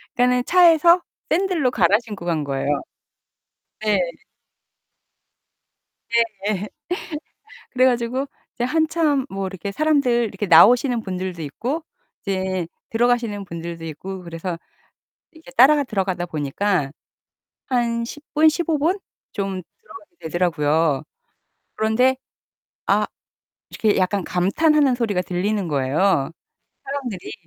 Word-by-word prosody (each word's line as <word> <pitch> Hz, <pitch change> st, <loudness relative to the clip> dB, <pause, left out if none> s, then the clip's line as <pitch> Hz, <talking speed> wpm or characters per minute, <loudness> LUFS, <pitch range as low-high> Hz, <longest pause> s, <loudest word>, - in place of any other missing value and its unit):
그러니까는 250 Hz, 0 st, +3 dB
차에서 345 Hz, -1 st, +6 dB, 0.3 s
샌들로 335 Hz, -7 st, +1 dB
갈아 195 Hz, -2 st, +4 dB
신고 205 Hz, -6 st, -8 dB
간 165 Hz, -3 st, 0 dB
거예요. 140 Hz, -1 st, -3 dB, 1.1 s
네. 210 Hz, -3 st, +2 dB, 2.5 s
예예. 210 Hz, -1 st, -1 dB, 1.0 s
그래 255 Hz, 0 st, +3 dB
가지고 250 Hz, +2 st, 0 dB, 0.3 s
이제 245 Hz, -, -2 dB
한참 310 Hz, -1 st, +1 dB
뭐 195 Hz, 0 st, -3 dB
이렇게 190 Hz, +1 st, -6 dB
사람들 270 Hz, -3 st, +2 dB
이렇게 205 Hz, +1 st, -4 dB
나오시는 235 Hz, -, +6 dB
분들도 185 Hz, -3 st, -5 dB
있고 250 Hz, -, -3 dB, 0.4 s
이제 185 Hz, -3 st, -2 dB, 0.2 s
들어가시는 230 Hz, -3 st, 0 dB
분들도 170 Hz, -1 st, -7 dB
있고 185 Hz, +4 st, -7 dB
그래서 170 Hz, +1 st, -5 dB, 0.7 s
이렇게 320 Hz, -4 st, -15 dB
따라 285 Hz, +4 st, +6 dB
들어가다 190 Hz, -6 st, -2 dB
보니까 155 Hz, +1 st, -1 dB, 0.8 s
한 235 Hz, -2 st, 0 dB
10 290 Hz, +5 st, -8 dB
분, 310 Hz, +1 st, +6 dB
15 320 Hz, -1 st, 0 dB
분 335 Hz, +7 st, +1 dB, 0.3 s
좀 195 Hz, -2 st, -3 dB, 0.2 s
들어가게 375 Hz, -6 st, -15 dB
되더라고요. 160 Hz, -3 st, +1 dB, 0.7 s
그런데 245 Hz, +4 st, +2 dB, 0.7 s
아 -, -, +3 dB, 0.6 s
이렇게 215 Hz, -3 st, +1 dB
약간 190 Hz, +1 st, +1 dB
감탄하는 265 Hz, -, +2 dB
소리가 215 Hz, -6 st, 0 dB
들리는 185 Hz, +2 st, -1 dB
거예요, 140 Hz, +2 st, +1 dB, 0.5 s
사람들이. 265 Hz, -9 st, -5 dB
210 Hz, 255 characters per minute, -22 LUFS, 180-265 Hz, 2.5 s, 차에서